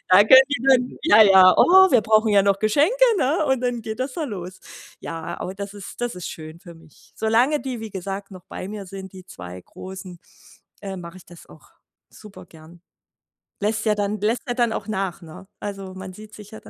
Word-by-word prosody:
da 185 Hz, -, +7 dB
können 260 Hz, +4 st, +8 dB
die 270 Hz, -4 st, -2 dB
dann 250 Hz, -1 st, +2 dB
ja, 215 Hz, +1 st, +7 dB
ja: 190 Hz, -2 st, +7 dB
„Oh, 380 Hz, 0 st, +6 dB
wir 245 Hz, -4 st, +4 dB
brauchen 215 Hz, +1 st, +3 dB
ja 200 Hz, -1 st, +4 dB
noch 200 Hz, 0 st, +1 dB
Geschenke“, 300 Hz, -, +2 dB
ne? 305 Hz, +4 st, 0 dB
Und 265 Hz, -2 st, 0 dB
dann 245 Hz, -1 st, -2 dB
geht 220 Hz, +2 st, -6 dB
das 260 Hz, +1 st, -3 dB
da 325 Hz, -, -4 dB
los. 185 Hz, -6 st, -8 dB, 0.4 s
Ja, 165 Hz, -1 st, -7 dB
aber 185 Hz, +2 st, -5 dB
das 200 Hz, 0 st, -7 dB
ist 200 Hz, +3 st, -10 dB
das 240 Hz, -6 st, -3 dB
ist 180 Hz, -, -6 dB
schön 160 Hz, +1 st, -10 dB
für 175 Hz, -3 st, -13 dB
mich. 160 Hz, -2 st, -21 dB
Solange 240 Hz, +7 st, +1 dB
die, 255 Hz, -4 st, -6 dB
wie 220 Hz, -1 st, -7 dB
gesagt, 195 Hz, +1 st, -6 dB
noch 185 Hz, -2 st, -13 dB
bei 185 Hz, -, -8 dB
mir 205 Hz, -1 st, -7 dB
sind, 190 Hz, 0 st, -10 dB
die 185 Hz, -1 st, -12 dB
2 90 Hz, -, -10 dB
Großen, 185 Hz, -2 st, -10 dB, 0.6 s
äh, 195 Hz, -1 st, -6 dB
mache 170 Hz, +1 st, -10 dB
ich -, -, -18 dB
das 175 Hz, -1 st, -15 dB
auch -, -, -18 dB, 0.4 s
super 210 Hz, -2 st, -14 dB
gern. 165 Hz, +2 st, -17 dB, 0.8 s
Lässt 215 Hz, +2 st, -1 dB
ja 210 Hz, -1 st, +2 dB
dann 205 Hz, 0 st, -3 dB
lässt 225 Hz, +3 st, -1 dB
ja 245 Hz, -, -1 dB
dann 240 Hz, -3 st, +1 dB
auch -, -, -5 dB
nach, 195 Hz, -4 st, -3 dB
ne? 165 Hz, +4 st, -13 dB
Also, 195 Hz, -2 st, -7 dB
man 190 Hz, 0 st, -9 dB
sieht 215 Hz, +2 st, -13 dB
sich 210 Hz, -1 st, -13 dB
ja 220 Hz, -, -10 dB
da -, -, -15 dB
205 Hz, 220 wpm, -22 LUFS, 185-230 Hz, 0.8 s, können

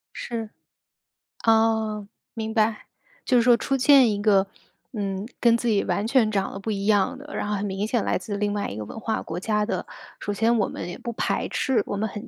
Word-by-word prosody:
是， 225 Hz, -2 st, -4 dB, 1.0 s
哦， 220 Hz, -2 st, +2 dB, 0.3 s
明 220 Hz, -1 st, -4 dB
白。 220 Hz, -1 st, +1 dB, 0.4 s
就 255 Hz, -, +3 dB
是 235 Hz, -, +4 dB
说 240 Hz, 0 st, +6 dB
出 270 Hz, +3 st, -1 dB
现 260 Hz, -2 st, +6 dB
一 205 Hz, 0 st, -2 dB
个， 200 Hz, -2 st, +4 dB, 0.5 s
嗯， 195 Hz, -2 st, -3 dB
跟 235 Hz, -1 st, +5 dB
自 240 Hz, -, -3 dB
己 210 Hz, -3 st, +2 dB
完 205 Hz, -, -1 dB
全 235 Hz, -3 st, +3 dB
长 195 Hz, -2 st, -1 dB
得 195 Hz, -, -7 dB
不 220 Hz, +2 st, -3 dB
一 200 Hz, -1 st, -2 dB
样 205 Hz, +3 st, +2 dB
的， 295 Hz, +2 st, -10 dB
然 -, -, -2 dB
后 210 Hz, -, -1 dB
很 200 Hz, +1 st, -2 dB
明 195 Hz, +1 st, -2 dB
显 230 Hz, -1 st, 0 dB
来 -, -, +1 dB
自 205 Hz, +3 st, -5 dB
另 205 Hz, 0 st, 0 dB
外 205 Hz, -1 st, -2 dB
一 -, -, -6 dB
个 110 Hz, -, -4 dB
文 225 Hz, -, -8 dB
化 220 Hz, 0 st, -2 dB
国 165 Hz, +2 st, -5 dB
家 210 Hz, +2 st, 0 dB
的。 230 Hz, -, -3 dB, 0.3 s
首 205 Hz, -, -3 dB
先 225 Hz, +3 st, +2 dB
我 205 Hz, -, +2 dB
们 170 Hz, -, -6 dB
也 175 Hz, -, -6 dB
不 235 Hz, -, -5 dB
排 -, -, -1 dB
斥， 255 Hz, -6 st, 0 dB
我 -, -, -3 dB
们 220 Hz, +1 st, -1 dB
很 210 Hz, +4 st, -8 dB
215 Hz, 245 characters per minute, -24 LUFS, 200-230 Hz, 1.0 s, 说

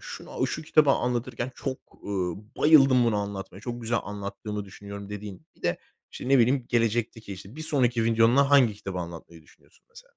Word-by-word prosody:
şunu -, -, -4 dB
şu 155 Hz, -, -4 dB
kitabı 155 Hz, -2 st, +4 dB
anlatırken 125 Hz, -1 st, -1 dB
çok, 130 Hz, +1 st, -4 dB, 0.2 s
uuu, 95 Hz, 0 st, -3 dB
bayıldım 135 Hz, -5 st, +6 dB
bunu 115 Hz, -3 st, +2 dB
anlatmaya, 100 Hz, -2 st, -5 dB
çok 120 Hz, +1 st, -6 dB
güzel 115 Hz, +1 st, 0 dB
anlattığımı 105 Hz, +1 st, -5 dB
düşünüyorum 100 Hz, +1 st, -9 dB
dediğin 105 Hz, -2 st, -8 dB
bir -, -, -26 dB
de, -, -, 0 dB, 0.3 s
işte, 125 Hz, -, -6 dB
ne 135 Hz, -, +5 dB
bileyim 125 Hz, +2 st, +3 dB
gelecekteki, 115 Hz, -2 st, 0 dB
işte, 100 Hz, +7 st, -11 dB
bir 155 Hz, -, -5 dB
sonraki 125 Hz, -6 st, +1 dB
videonda 115 Hz, +5 st, +4 dB
hangi 130 Hz, -7 st, +5 dB
kitabı 95 Hz, -2 st, -6 dB
anlatmayı 85 Hz, -1 st, -8 dB
düşünüyorsun, -, -, -25 dB
mesela? -, -, -14 dB
115 Hz, 170 wpm, -26 LUFS, 100-125 Hz, 0.3 s, bayıldım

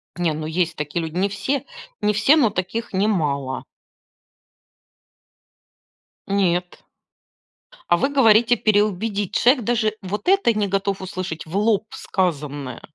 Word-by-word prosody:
Не, 175 Hz, -3 st, 0 dB
ну 155 Hz, 0 st, -5 dB
есть 170 Hz, +1 st, -1 dB
такие 150 Hz, +3 st, -3 dB
люди. 160 Hz, 0 st, -6 dB
Не 190 Hz, +3 st, +1 dB
все, 250 Hz, +8 st, -2 dB, 0.4 s
не 210 Hz, -, +2 dB
все 215 Hz, +9 st, +4 dB
но 250 Hz, -8 st, +4 dB
таких 205 Hz, +5 st, -4 dB
немало. 150 Hz, -10 st, 0 dB, 2.6 s
Нет. 180 Hz, -3 st, 0 dB, 1.1 s
А 175 Hz, -, +6 dB
вы 270 Hz, -, +1 dB
говорите 240 Hz, -3 st, +4 dB
переубедить. 205 Hz, -1 st, 0 dB
Человек 250 Hz, +1 st, +4 dB
даже 220 Hz, -1 st, +1 dB
вот 200 Hz, +2 st, -5 dB
это 385 Hz, -, +4 dB
не 210 Hz, -1 st, 0 dB
готов 195 Hz, 0 st, -1 dB
услышать 185 Hz, -3 st, -5 dB
в 160 Hz, +3 st, -8 dB
лоб 215 Hz, 0 st, +2 dB
сказанное. 145 Hz, -, -3 dB
195 Hz, 125 wpm, -22 LUFS, 175-220 Hz, 2.6 s, А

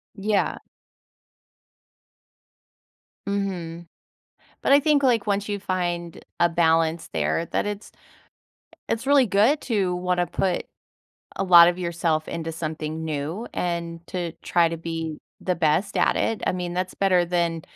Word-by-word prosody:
Yeah. 205 Hz, 0 st, 0 dB, 2.7 s
Mhm. 175 Hz, -4 st, -3 dB, 0.8 s
But -, -, +3 dB
I 285 Hz, -, +7 dB
think, 295 Hz, -1 st, +3 dB
like, 235 Hz, -6 st, +2 dB
once 205 Hz, 0 st, 0 dB
you 205 Hz, -, -2 dB
find 175 Hz, -3 st, -3 dB, 0.2 s
a 175 Hz, -, +4 dB
balance 165 Hz, -1 st, +1 dB
there, 165 Hz, -, 0 dB
that -, -, -1 dB
it's 205 Hz, 0 st, -6 dB, 1.0 s
it's 230 Hz, +4 st, -2 dB
really 280 Hz, -2 st, +5 dB
good 220 Hz, +8 st, +3 dB
to 195 Hz, -7 st, 0 dB
wanna 180 Hz, 0 st, 0 dB
put 185 Hz, +2 st, -1 dB, 0.7 s
a -, -, -1 dB
lot 175 Hz, -2 st, +9 dB
of 175 Hz, -, 0 dB
yourself 170 Hz, -3 st, -1 dB
into 165 Hz, 0 st, -4 dB
something 160 Hz, 0 st, -4 dB
new 160 Hz, +8 st, -3 dB
and 170 Hz, -1 st, -3 dB
to 175 Hz, -2 st, -3 dB
try 170 Hz, -1 st, +3 dB
to 165 Hz, -, -4 dB
be 165 Hz, -1 st, -5 dB, 0.2 s
the 180 Hz, -, 0 dB
best 165 Hz, +4 st, +1 dB
at -, -, +3 dB
it. 225 Hz, -, 0 dB
I -, -, +2 dB
mean, 180 Hz, -1 st, -4 dB
that's 185 Hz, 0 st, -2 dB
better 185 Hz, -3 st, +3 dB
than 170 Hz, -2 st, -1 dB
175 Hz, 140 wpm, -24 LUFS, 165-200 Hz, 2.7 s, lot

